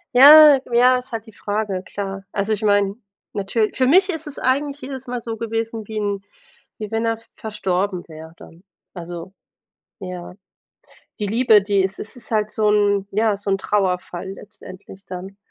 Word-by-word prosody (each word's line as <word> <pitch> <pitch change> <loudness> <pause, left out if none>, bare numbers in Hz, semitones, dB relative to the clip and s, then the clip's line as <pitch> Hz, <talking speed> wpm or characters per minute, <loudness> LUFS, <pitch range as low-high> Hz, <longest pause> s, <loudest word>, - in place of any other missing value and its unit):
Ja, 295 +1 +10
ja. 250 +2 +5
Ist 250 +1 -8
halt 225 -2 -5
die 220 - -15
Frage, 205 -3 -3
klar. 195 -1 -6
Also 205 +2 -1
ich 215 +1 -4
meine, 205 -1 +2 0.4
natür 210 +2 0
für 255 -1 +1
mich 375 +6 +5
ist 320 -3 -4
es 290 - -7
eigentlich 280 +2 0
jedes 260 -1 -7
Mal 245 -1 -4
so 225 -1 -5
gewesen, 225 -1 -4
wie 215 -1 -4
'n 200 -1 -2 0.6
wie 215 -1 -7
wenn 225 +1 -1
er 225 0 0
v 225 - -20
verstorben 195 -3 -2
wäre 160 0 -11
dann. 170 +3 -15 0.3
Also, 175 +1 -8 0.7
ja. 180 -2 -7 0.9
Die 205 - -1
Liebe, 220 -1 +4
die 200 -1 +1
es 190 +1 -3
es 220 - -6
ist 235 - -9
halt 215 -1 0
so 215 -1 +1
'n 205 -1 +2
ja, 215 0 +1
so 200 0 -4
'n 195 - +1
Trauerfall 190 -2 -2
letztendlich 195 -1 -13
dann. 185 +2 -8
210 Hz, 180 wpm, -21 LUFS, 195-230 Hz, 0.9 s, Ja